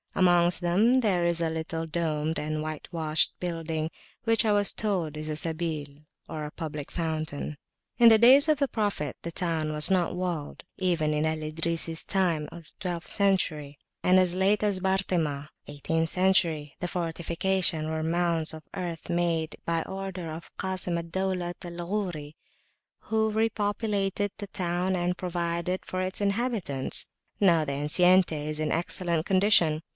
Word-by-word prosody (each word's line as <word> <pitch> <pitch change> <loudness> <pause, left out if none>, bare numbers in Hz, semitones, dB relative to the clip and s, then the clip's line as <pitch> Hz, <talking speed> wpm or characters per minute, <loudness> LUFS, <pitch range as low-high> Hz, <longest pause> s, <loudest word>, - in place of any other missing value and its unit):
Amongst 175 -1 +4
them 210 +9 +3
there 190 -6 +1
is 170 -1 +2
a 165 -1 +1
little 160 0 -3
domed 160 -1 -1
and 155 0 -2
whitewashed 155 0 +1
building, 165 -2 -3 0.4
which 225 0 +3
I 220 - +2
was 205 -1 +3
told 180 -8 -1
is 155 0 -5
a 155 - -2
Sabil 160 -2 -1 0.4
or 150 -2 -5
public 150 -3 -6
fountain. 155 -3 -3 0.4
In 235 -1 +8
the 225 - +7
days 265 +7 +7
of 305 - +4
the 280 0 +1
Prophet 205 - -2
the 170 - -5
town 165 -2 -1
[p.392] 155 - -3
was 150 +4 +4
not 180 -2 +1
walled. 175 -5 -4
Even 170 -5 +1
in 150 +1 0
Al 160 0 0
Idrisi's 165 +1 -1
time 170 -6 0 0.3
(twelfth 175 -3 -3
century), 155 -8 0 0.3
and 185 +1 +5
as 180 -1 +3
late 195 +3 +2
as 200 -3 +1
Bartema's 175 -7 0 0.2
(eighteenth 160 +3 -1
century), 170 -6 +2
the 180 - -2
fortifications 170 0 0
were 160 0 -2
mounds 165 -1 0
of 160 0 -9
earth, 175 -3 -5
made 170 -2 0
by 165 -1 0
order 190 -3 -6
of 160 +2 -9
Kasim 185 -2 -2
al 170 - -3
Daulat 180 0 -3
al 175 -1 -6
Ghori, 175 -7 -3 0.8
who 220 0 +2
re 220 +1 +1
populated 205 -2 -1
the 205 - -5
town 180 0 -1
and 180 0 0
provided 175 0 -2
for 185 - -3
its 185 +1 -2
inhabitants. 200 - -1 0.3
Now, 170 -5 +4
the 140 -2 -3
enceinte 180 +5 +4
is 150 0 -3
in 155 - -1
excellent 170 -1 -1
condition. 185 -5 +3
170 Hz, 155 wpm, -27 LUFS, 155-190 Hz, 0.8 s, In